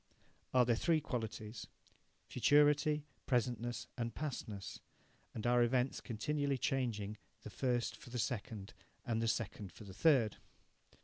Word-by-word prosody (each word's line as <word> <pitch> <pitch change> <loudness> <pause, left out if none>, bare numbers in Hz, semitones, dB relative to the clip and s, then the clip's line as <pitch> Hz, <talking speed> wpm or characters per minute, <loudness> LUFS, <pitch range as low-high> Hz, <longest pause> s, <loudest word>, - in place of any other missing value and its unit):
Are 125 -1 +5
there 120 -1 +3
three 165 +6 +3
qualities 110 -4 -4 0.6
futurity, 150 +3 +4 0.2
presentness, 120 -1 0
and 115 -2 -3
pastness, 120 -9 -4 0.6
and 110 - -4
are 120 0 +5
events 125 +2 +2
continually 140 +4 -1
changing 115 -7 -1 0.3
the 110 - -8
first 120 -1 0
for 150 -5 -13
the 125 - -4
second, 110 -2 -3 0.3
and 115 -3 0
the 115 - +1
second 105 -4 -2
for 105 - -12
the 100 -2 -9
third? 120 - +4
120 Hz, 130 wpm, -36 LUFS, 110-135 Hz, 0.6 s, Are